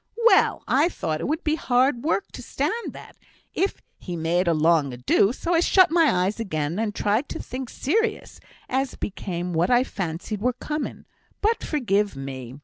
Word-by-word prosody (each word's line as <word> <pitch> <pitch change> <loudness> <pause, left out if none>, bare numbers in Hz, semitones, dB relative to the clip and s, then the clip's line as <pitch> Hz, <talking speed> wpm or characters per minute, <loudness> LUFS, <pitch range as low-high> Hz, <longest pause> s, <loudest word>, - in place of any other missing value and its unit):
Well! 410 -5 +5
I 340 - +3
thought 155 - -3
it - - -2
would 310 +4 -2
be 305 - +1
hard 255 -4 +1
work 330 +6 -1
to - - -8
stand - - -1 0.2
that, - - -12 0.4
if 390 - -1 0.2
he 180 - -6
made 170 +2 0
a 170 - +4
long 155 -3 +3
ado; 125 - +2
so 335 +7 -2
I 330 - +4
shut 370 0 +5
my 310 - +3
eyes 205 +4 -2
again, 155 -4 -2
and 220 -2 -2
tried 215 +7 0
to - - -5
think 255 -1 -6
serious, 430 - -1 0.3
as 265 0 -1
became 180 -3 -4
what 165 +2 +1
I 245 0 +5
fancied 190 -1 -4
were 250 +2 +1
coming; 300 +4 -5 0.3
but, 445 +2 +1
forgive 210 - 0
me! 130 -2 -7
215 Hz, 180 wpm, -24 LUFS, -, 0.4 s, Well